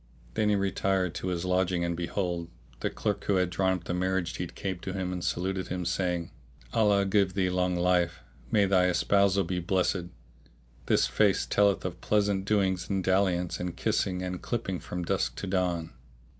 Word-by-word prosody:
Then 105 Hz, -, +1 dB
he 105 Hz, -, +3 dB
retired 95 Hz, -2 st, 0 dB
to 90 Hz, -, -4 dB
his 90 Hz, -1 st, -2 dB
lodging 90 Hz, -1 st, +1 dB
and 85 Hz, 0 st, -1 dB
behold, 85 Hz, -1 st, -2 dB, 0.3 s
the -, -, -1 dB
clerk -, -, -2 dB
who 100 Hz, -, +2 dB
had 90 Hz, -1 st, +1 dB
drawn 95 Hz, +1 st, +2 dB
up 90 Hz, -2 st, -4 dB
the 90 Hz, -, -3 dB
marriage 90 Hz, -1 st, 0 dB
deed -, -, -5 dB
came 95 Hz, -3 st, -3 dB
to 95 Hz, -, -5 dB
him[FN#641] 95 Hz, -2 st, -2 dB
and 90 Hz, -1 st, -4 dB
saluted 95 Hz, +1 st, -1 dB
him, 90 Hz, -1 st, -3 dB
saying, 90 Hz, -1 st, -1 dB, 0.4 s
"Allah 100 Hz, -2 st, +3 dB
give 95 Hz, -1 st, +2 dB
thee 95 Hz, -2 st, +1 dB
long 90 Hz, 0 st, +1 dB
life! 85 Hz, -2 st, +1 dB, 0.3 s
May 100 Hz, +5 st, +4 dB
thy 95 Hz, -2 st, +4 dB
espousal 100 Hz, +2 st, +3 dB
be 90 Hz, +1 st, -2 dB
blessed! 90 Hz, 0 st, 0 dB, 0.8 s
This -, -, +4 dB
face 105 Hz, -3 st, +2 dB
telleth 100 Hz, -2 st, +2 dB
of 90 Hz, -1 st, -5 dB
pleasant 100 Hz, -2 st, +1 dB
doings 95 Hz, -4 st, +1 dB
and 95 Hz, -2 st, 0 dB
dalliance 95 Hz, -2 st, +1 dB
and 90 Hz, -1 st, -4 dB
kissing 90 Hz, -1 st, 0 dB
and 90 Hz, -1 st, -4 dB
clipping 100 Hz, -7 st, -2 dB
from 90 Hz, -1 st, -5 dB
dusk -, -, 0 dB
to -, -, -5 dB
dawn." 90 Hz, -4 st, -1 dB
90 Hz, 185 wpm, -28 LUFS, 90-95 Hz, 0.8 s, May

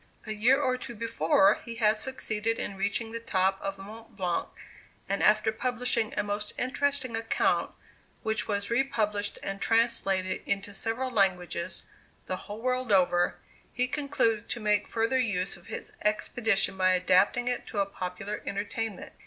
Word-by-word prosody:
A 220 Hz, -, -5 dB
year 240 Hz, +6 st, +4 dB
or 255 Hz, -3 st, +1 dB
two 240 Hz, -1 st, -8 dB
before, 200 Hz, -2 st, +3 dB
he 235 Hz, -, -7 dB
had 215 Hz, -2 st, +3 dB
succeeded 225 Hz, -2 st, -1 dB
in 200 Hz, -, -4 dB
reaching 205 Hz, +3 st, -1 dB
the 230 Hz, -, -4 dB
top 190 Hz, -4 st, +1 dB
of 195 Hz, 0 st, -3 dB
Mont 215 Hz, +4 st, -11 dB
Blanc, 180 Hz, -3 st, 0 dB, 0.6 s
and 200 Hz, +1 st, -1 dB
after 215 Hz, +1 st, +4 dB
publishing 245 Hz, -1 st, -1 dB
a 210 Hz, -, +2 dB
most 205 Hz, 0 st, -3 dB
interesting 260 Hz, -1 st, 0 dB
account, 225 Hz, 0 st, +1 dB, 0.5 s
which 220 Hz, 0 st, 0 dB
was 200 Hz, 0 st, -2 dB
re 240 Hz, +3 st, +4 dB
published 210 Hz, -6 st, -1 dB
and 195 Hz, 0 st, -4 dB
translated 195 Hz, -5 st, +1 dB
into 200 Hz, +1 st, -1 dB
several 230 Hz, +6 st, -2 dB
languages, 180 Hz, -4 st, 0 dB, 0.4 s
the 185 Hz, -, -2 dB
whole 210 Hz, +3 st, -7 dB
world 255 Hz, -2 st, 0 dB
over, 175 Hz, -2 st, +4 dB, 0.4 s
he 250 Hz, 0 st, 0 dB
concluded 255 Hz, -6 st, 0 dB
to 240 Hz, -, -3 dB
make 210 Hz, -2 st, +2 dB
further 230 Hz, +3 st, +1 dB
use 195 Hz, -6 st, 0 dB
of 175 Hz, -, -17 dB
his -, -, -6 dB
expedition 210 Hz, -1 st, +1 dB
by 185 Hz, 0 st, +4 dB
adapting 185 Hz, +7 st, +3 dB
it 245 Hz, 0 st, -1 dB
to -, -, -7 dB
a 200 Hz, -, +3 dB
popular 195 Hz, +2 st, -5 dB
entertainment. 205 Hz, +1 st, -3 dB
215 Hz, 160 wpm, -29 LUFS, 195-235 Hz, 0.6 s, year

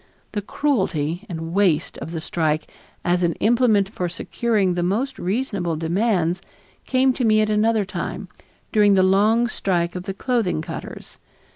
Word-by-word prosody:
The 205 Hz, -, -2 dB
cruelty 190 Hz, -, -1 dB
and 165 Hz, -1 st, -5 dB
waste 190 Hz, -6 st, +2 dB
of -, -, -6 dB
the 165 Hz, -1 st, -4 dB
strike 155 Hz, -2 st, -1 dB, 0.4 s
as 175 Hz, +1 st, +2 dB
an 170 Hz, -1 st, +2 dB
implement 220 Hz, -2 st, +3 dB
for 180 Hz, -3 st, -3 dB
securing 205 Hz, +1 st, 0 dB
the 175 Hz, -, -1 dB
most 225 Hz, +10 st, -1 dB
reasonable 195 Hz, -4 st, -1 dB
demands 175 Hz, +1 st, 0 dB, 0.5 s
came 260 Hz, 0 st, +3 dB
to 250 Hz, -, -2 dB
me 215 Hz, -2 st, +4 dB
at 215 Hz, 0 st, +2 dB
another 215 Hz, 0 st, +2 dB
time, 200 Hz, -, -5 dB, 0.4 s
during 205 Hz, -2 st, +5 dB
the 190 Hz, -, +4 dB
long 210 Hz, +5 st, +3 dB
strike 175 Hz, -7 st, -1 dB
of 180 Hz, 0 st, -5 dB
the 195 Hz, -1 st, -4 dB
clothing 215 Hz, -9 st, 0 dB
cutters. -, -, -8 dB
195 Hz, 155 wpm, -22 LUFS, 175-220 Hz, 0.5 s, during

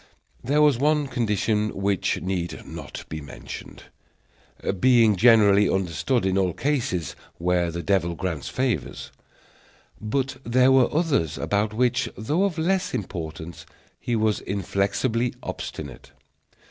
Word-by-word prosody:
There 145 Hz, +5 st, +3 dB
was 145 Hz, -5 st, +4 dB
one 150 Hz, +1 st, +2 dB
condition 110 Hz, -4 st, 0 dB
which 100 Hz, -1 st, 0 dB
need 90 Hz, -2 st, -3 dB
not -, -, -8 dB
be 80 Hz, 0 st, -6 dB
mentioned, 70 Hz, -, -9 dB, 1.0 s
being 115 Hz, -4 st, +5 dB
generally 105 Hz, -2 st, +5 dB
understood 95 Hz, -, 0 dB
in 95 Hz, 0 st, +2 dB
all 90 Hz, -3 st, +1 dB
cases 115 Hz, -, -1 dB, 0.2 s
where 90 Hz, 0 st, +1 dB
the 85 Hz, +1 st, -5 dB
devil 90 Hz, -4 st, +1 dB
grants 85 Hz, -4 st, -4 dB
favors; 130 Hz, -2 st, -2 dB, 0.9 s
but 130 Hz, +5 st, -2 dB
there 125 Hz, +2 st, +4 dB
were 130 Hz, -2 st, +4 dB
others 135 Hz, -, 0 dB
about 105 Hz, +1 st, 0 dB
which, 120 Hz, +2 st, +1 dB
though 150 Hz, -, +1 dB
of 190 Hz, -5 st, -2 dB
less 180 Hz, -1 st, 0 dB
importance, 85 Hz, -5 st, -6 dB, 0.3 s
he 120 Hz, -, -2 dB
was 110 Hz, -1 st, +1 dB
inflexibly 100 Hz, +5 st, -1 dB
obstinate. 70 Hz, -5 st, -7 dB
105 Hz, 120 wpm, -24 LUFS, 90-130 Hz, 1.0 s, being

